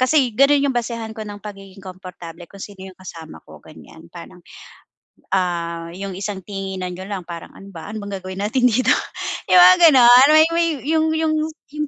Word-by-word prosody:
kasi 255 -2 +2
gano'n 275 +4 +3
'yong - - -1
basehan 230 -2 -4
ko 220 - -10
ng 205 0 -11
pagiging 195 -2 -11
komportable 180 -2 -11
kung 200 - -16
sino 190 -2 -10
'yong 185 - -16
kasama 165 -4 -11
ko, - - -15
ganiyan. - - -16
Parang, - - -13 0.9
ah, 170 -3 -2
'yong 195 +1 -6
isang 195 -2 -6
tinginan 190 -2 -6
niyo 185 +2 -9
lang 195 -3 -6
parang, 170 -1 -10
"Ano 195 0 -13
ba, 165 0 -10
ano 215 -1 -7
bang 200 -1 -6
gagawin 185 +1 -7
natin 250 +4 +1
dito?" 250 +2 +1 0.6
'yong 365 - +5
mga 365 0 +7
gano'n, 250 0 +7
may 315 +1 +6
may 335 0 +1 0.2
'yong 315 0 +1
'yong 315 -1 0 0.4
'yong 300 0 -4
200 Hz, 185 wpm, -19 LUFS, 185-255 Hz, 0.9 s, mga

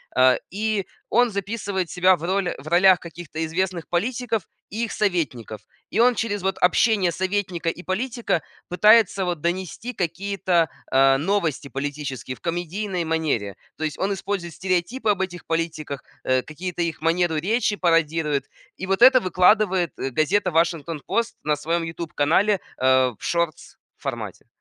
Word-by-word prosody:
А, 130 0 +5 0.2
и 210 -1 -1 0.2
он 240 +1 +4
записывает 200 -2 -3
себя 185 +1 +4
в 165 - -12
роли 190 +1 0
в 140 - -12
ролях 180 +2 +5
каких-то 170 -2 -9
известных 175 +1 -2
политиков 225 +3 -1 0.3
и 220 +4 -3
их 225 - -7
советников. 135 - -2 0.3
И 215 - -2
он 245 +1 +5
через 205 -3 -2
вот 190 0 0
общение 185 0 +3
советника 185 -2 -1
и 180 - -6
политика 230 -1 -1 0.3
пытается 200 +1 +5
вот 175 -4 -2
донести 185 +8 -3
какие-то, 180 -2 0 0.2
а, 135 0 +5
новости 165 -3 -1
политические 135 -1 -5
в - - -21
комедийной 175 +2 -3
манере. 155 - -1 0.2
То 155 - -5
есть 155 -2 -2
он 200 +1 0
использует 190 -3 -4
стереотипы 190 - -1
об 200 -2 +2
этих 175 -2 -4
политиках, 160 -4 -3 0.2
э, 130 0 +2
какие-то 175 +5 -5
их 165 -2 -4
манеру 165 +1 +1
речи 210 +6 +1
пародирует 165 -5 +1 0.3
и 190 - -5
вот 195 +2 0
это 255 +1 +8
выкладывает, 185 -2 +3
э, 135 - -2
газета 185 +8 +1
"Вашингтон 165 -2 0
пост" 230 +5 -1
на 150 0 +1
своем 165 +3 -1
"Ютуб" 165 0 -6
канале, 190 +8 +3 0.2
э, 130 0 +4
в - - -17
шортс 170 -2 -2 0.2
формате. - - -6
175 Hz, 155 wpm, -23 LUFS, 160-200 Hz, 0.3 s, это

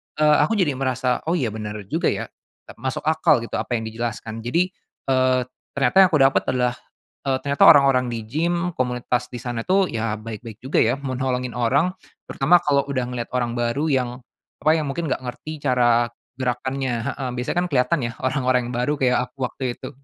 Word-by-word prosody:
eee, 150 0 +4
aku 225 - +1
jadi 150 -10 +1
merasa, 130 -1 0
oh, 170 - +2
iya, 130 -10 0
bener 105 -1 -5 0.2
juga - - +1
ya, - - 0 0.4
tep - - -14
masuk 130 +2 -3
akal 155 -6 +3
gitu - - -4
apa 120 - -2
yang 110 - -2
dijelaskan. 115 0 -5
Jadi, 170 +11 0 0.4
eee, 130 -1 +3 0.3
ternyata 135 -3 +1
yang - - +6
aku 155 -2 +2
dapet 135 0 +3
adalah, 125 -1 0 0.5
eee, 130 -1 +2
ternyata 140 0 +2
orang-orang 135 -4 +6
di 115 -2 -4
gim, 170 +9 -1
komunitas 125 -1 -1
di 120 - -5
sana 120 -2 -3
tuh 190 0 +3
ya 115 -1 -1
baik-baik 110 +1 -9
juga 130 - +1
ya, 120 +3 +3
mau 130 -2 -4
nolongin 125 -1 -1
orang 140 +9 +2 0.4
terutama 170 +6 +4
kalau 140 -2 +2
udah 130 -3 -1
ngeliat 120 -1 -4
orang 120 -1 -1
baru 120 +6 0
yang, 130 -3 +1 0.5
apa, 155 - +5
yang 155 -3 -2
mungkin 165 +4 -3
gak - - 0
ngerti 150 +5 -7
cara 120 -3 +3 0.3
gerakannya 130 +1 -1
heeh, 135 -2 -3
biasanya 125 +7 -3
kan - - -3
keliatan 130 +4 +2
ya 115 - -6
orang-orang 130 -2 +1
yang - - -5
baru 125 +5 +1
kayak 125 -2 +3
aku - - -58
waktu 130 -2 -3
itu. - - -7
130 Hz, 195 wpm, -22 LUFS, 120-140 Hz, 0.5 s, yang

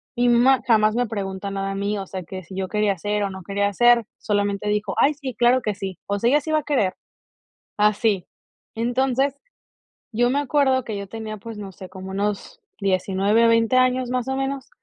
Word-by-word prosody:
Y 245 0 +2
mi 240 - +5
mamá 265 +1 +5
jamás 215 -1 +4
me 245 - +1
pregunta 200 -2 -4
nada 195 0 -3
a - - -4
mí, 200 +1 -1
o 195 - -6
sea, 185 -1 -6
que 185 +2 -8
si 190 - -10
yo 190 -1 -3
quería 210 -1 +1
hacer 205 +3 -2
o 200 - -1
no 190 -1 -9
quería 200 +2 -1
ser, 240 +1 +5
solamente 205 -1 -1
dijo: 210 -1 -1
"Ay, 295 - +4
sí, 265 -4 -6
claro 245 +3 +4
que 210 -2 -2
sí". 190 -2 -6
O 200 0 0
sea, 235 - +2
ella 290 +3 +4
sí 315 +2 -5
va 310 - +3
a - - -7
querer. 255 -11 +1 0.9
Así. 210 -2 +2 0.5
Entonces, 260 +3 +1 0.8
yo 245 +1 +3
me 275 - +1
acuerdo 275 -2 +2
que 215 - -4
yo 200 0 -6
tenía, 220 +1 -6
pues, 225 +2 -9
no 200 -2 -7
sé, 185 0 -11
como 190 0 -8
unos 205 - -3 0.2
19 195 +3 +2
o 230 - +5
20 230 +2 +3
años 255 0 +2
más 250 0 -1
o 265 - -1
menos, 270 0 -3
215 Hz, 220 wpm, -23 LUFS, 195-250 Hz, 0.9 s, mi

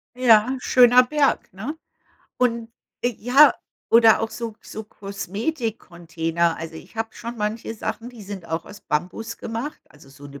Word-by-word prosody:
Ja, 245 0 +5
schöner 250 0 +6
Berg, 285 +2 +1
ne? 225 +11 -5 0.6
Und 235 -2 0 0.3
ja, 245 +5 +5 0.4
oder 225 -1 +6
auch 225 - -2
so 225 0 -5
so 220 - -7
Kosmetik-Container, 195 - -3
also, 165 0 -7
ich 160 - -12
habe 225 0 -2
schon 235 0 -7
manche 220 +2 -3
Sachen, 230 +2 -5
die 240 -3 -12
sind 195 -3 -8
auch 160 0 -3
aus 205 -1 -12
Bambus 185 +9 -3
gemacht, 235 +7 -5
also, 145 -2 -18
so 140 +1 -13
'ne 140 0 -11
225 Hz, 150 wpm, -23 LUFS, 180-240 Hz, 0.6 s, schöner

